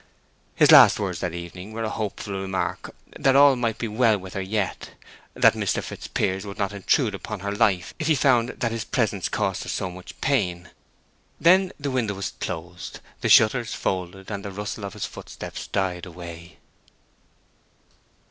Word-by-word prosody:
His - - +6
last - - +9
words - - -2
that 85 -1 -3
evening 90 +4 -8
were 115 +1 -3
a 110 - -1
hopeful 105 -1 -4
remark 95 -1 -3 0.2
that 135 -1 +3
all 140 -1 +7
might 115 -3 -1
be 115 - -3
well 110 0 +3
with 95 -1 -10
her 100 - -3
yet; 100 +1 -3 0.4
that - - +5
Mr. - - -1
Fitzpiers 95 0 -2
would 100 0 -8
not 100 -1 -1
intrude 100 -2 +1
upon 105 -3 -6
her 100 0 -3
life, 100 -4 +1
if 155 - -2
he 160 - +4
found 125 -4 +3
that 120 -2 -2
his 115 -1 -3
presence 105 -7 -1
cost - - -1
her - - -7
so 95 - -2
much 90 0 -11
pain. 90 -11 0 0.7
Then 185 +2 +5
the 140 -1 -2
window 115 -6 -1
was 100 - -4
closed, 85 +2 -6 0.2
the - - -1
shutters 115 +1 +5
folded, 95 +2 -3
and 100 -1 -4
the 100 - -5
rustle 105 +1 -5
of 100 - -6
his - - -4
footsteps - - -8
died 90 -2 -2
away. 85 -1 -10
100 Hz, 175 wpm, -24 LUFS, 95-115 Hz, 0.7 s, last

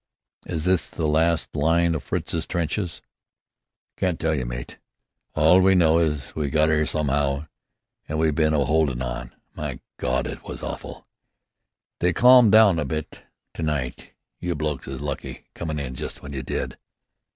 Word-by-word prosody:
"Is 80 -2 -3
this 90 -3 +2
the 80 - -3
last 80 +2 +1
line 85 +3 +2
o' - - -1
Fritzie's 80 +3 -2
trenches?" 85 +1 -2 0.9
"Can't 90 -3 0
tell 80 0 +1
you, 65 -5 -2
mate. - - -7 0.6
All 80 +5 +6
we 95 +1 +5
know 85 -2 +5
is, 75 -4 -1
we 75 -2 -1
got 80 +1 +3
'ere 75 0 +2
some'ow 70 -1 0 0.6
an' 80 - -2
we 80 0 +2
been 75 +1 +2
a - - +2
'oldin' 70 -3 +1
on. - - -5 0.2
My - - -5 0.2
Gawd! - - 0
It's - - -6
been - - -7
awful! - - -8 0.9
They 90 0 +2
calmed 125 +2 +7
down 105 -6 +6
a - - 0
bit 75 +3 -5 0.3
to - - -7
night. 75 -5 -3 0.3
You 90 -1 -2
blokes 75 -2 -3
is 65 -1 -6
lucky - - -5
comin' 80 -2 -4
in 65 -3 -4
just 60 - -5
w'en 70 0 -9
you 65 - -3
did." 65 - -4
80 Hz, 165 wpm, -24 LUFS, 70-85 Hz, 0.9 s, calmed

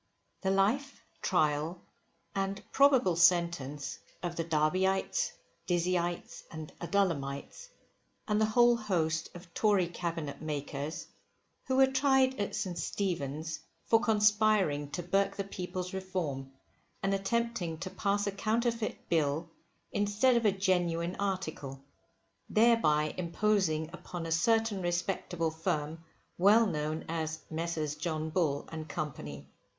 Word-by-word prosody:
The 190 - 0
Life, 220 +9 +1 0.2
Trial, 155 0 +1 0.5
and 195 0 -2
probable 265 -11 +5
Sentence 170 -5 +2 0.2
of 175 -1 -2
the 165 - -1
DERBYITES, 185 - +1 0.4
DIZZYITES, 175 0 -1
AND 160 -2 -8
ADULLAMITES, 170 - -1 0.6
AND 210 -1 +2
THE 215 - +4
WHOLE 240 +2 +5
HOST 165 -7 0
OF 175 0 -12
TORY 205 -5 +3
CABINET 165 -4 -4
MAKERS, 145 0 -4 0.6
Who 260 - +1
were 265 0 +7
tried 265 -1 +3
at 200 - -2
St. 175 -3 -3
Stephen's, 160 -5 -2 0.3
for 225 - +5
conspiring 210 -9 +3
to 175 +4 -4
burke 195 +3 +1
the 200 - -2
People's 185 -1 -5
Reform, 170 -8 -3 0.5
and 195 0 +2
attempting 195 -4 -1
to 185 0 -4
pass 205 0 0
a 200 - 0
Counterfeit 230 +2 -1
Bill 160 0 0 0.4
instead 205 +5 +2
of 235 -1 +2
a 210 - +6
Genuine 180 -2 0
Article; 170 -9 -3 0.7
thereby 215 -10 +4
imposing 170 -3 +1
upon 175 -2 -6
a 165 - -4
certain 220 +4 +2
respectable 175 -1 -1
firm, 160 0 -2 0.4
well 210 +5 +6
known 155 -4 -2
as 160 -1 -3
Messrs 160 -2 -2
John 155 0 -3
Bull 155 -5 0
and 160 -1 -6
Company. 75 - -5
175 Hz, 120 wpm, -31 LUFS, 160-205 Hz, 0.7 s, were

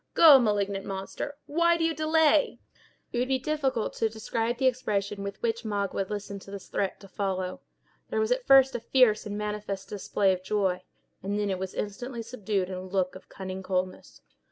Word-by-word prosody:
Go, 305 -5 +9
malignant 205 -4 0
monster—why 290 - -1
do 330 - -1
you 325 0 +2
delay?" 310 -1 +3 0.6
It 240 - 0
would 250 - +1
be 265 0 +2
difficult 265 -4 -1
to 225 - +1
describe 225 +2 -2
the 265 - 0
expression 205 -5 0
with 200 0 -5
which 230 0 0
Magua 200 -3 -2
listened 200 -1 -5
to - - -13
this 200 -1 -8
threat 195 -1 -1
to 195 - -12
follow. 190 -2 -3 0.5
There - - -1
was 440 +2 +1
at - - 0
first 270 0 +7
a - - -2
fierce 225 -3 +3
and 205 0 -4
manifest 210 -2 -4
display 195 -1 +1
of 185 - -4
joy, 190 -2 0 0.4
and 200 +2 -2
then 205 -1 0
it 185 - -2
was 190 0 -5
instantly 230 +4 -4
subdued 210 -5 -2
in - - -5
a 185 - -4
look 185 0 -1
of 185 - -13
cunning 190 0 -6
coldness. 185 -1 -3
210 Hz, 190 wpm, -28 LUFS, 195-255 Hz, 0.6 s, Go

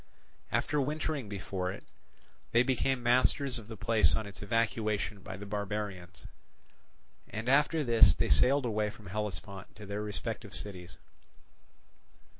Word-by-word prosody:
After 150 -1 +1
wintering 145 -3 -2
before 95 -2 -3
it, 100 - -9 0.7
they 120 +1 +6
became 130 0 0
masters 125 +2 +3
of 105 - -12
the 110 -1 -8
place 110 +2 +4
on 110 - -2
its 100 -2 -10
evacuation 110 -1 0
by 95 +1 -7
the 100 - -8
barbarians; 100 -3 -4 1.0
and 110 +3 -5
after 150 +4 +3
this 115 -3 +6
they - - 0
sailed 130 - +5
away 105 -2 0
from 105 0 -13
Hellespont 100 -1 -5
to 105 - -10
their 100 +1 -4
respective 105 -1 -5
cities. 90 -2 -7
105 Hz, 135 wpm, -31 LUFS, 100-120 Hz, 1.0 s, they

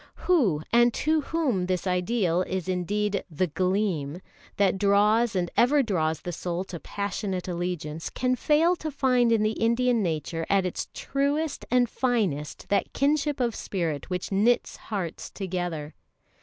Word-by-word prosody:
Who, 225 - +3 0.3
to 310 +1 +1
whom 270 - 0
this 185 -1 -1
ideal 180 -1 +1
is 185 -1 -3
indeed 200 +2 -1
"The 175 +3 0
Gleam," 180 -3 -1 0.4
that 195 -1 +2
draws 210 +3 +3
and 175 -2 0
ever 275 +4 +4
draws 160 - 0
the 175 - -4
soul 175 +1 -3
to 185 -3 -8
passionate 195 -1 -3
allegiance, 170 -3 -3
can 255 0 0
fail 310 +7 +3
to 315 - -4
find 255 -4 +2
in 225 -2 +3
the 215 - +2
Indian 235 +1 +2
nature 165 -2 -2
at 195 -1 +3
its 180 - -3
truest 285 +3 -1
and 250 -1 +3
finest 210 - -1
that 200 - 0
kinship 290 +1 +1
of 240 -2 +1
spirit 165 -8 -3
which 180 +1 -3
knits 215 +5 +2
hearts 190 -7 -5
together? 175 -5 -4
200 Hz, 145 wpm, -26 LUFS, 175-245 Hz, 0.4 s, ever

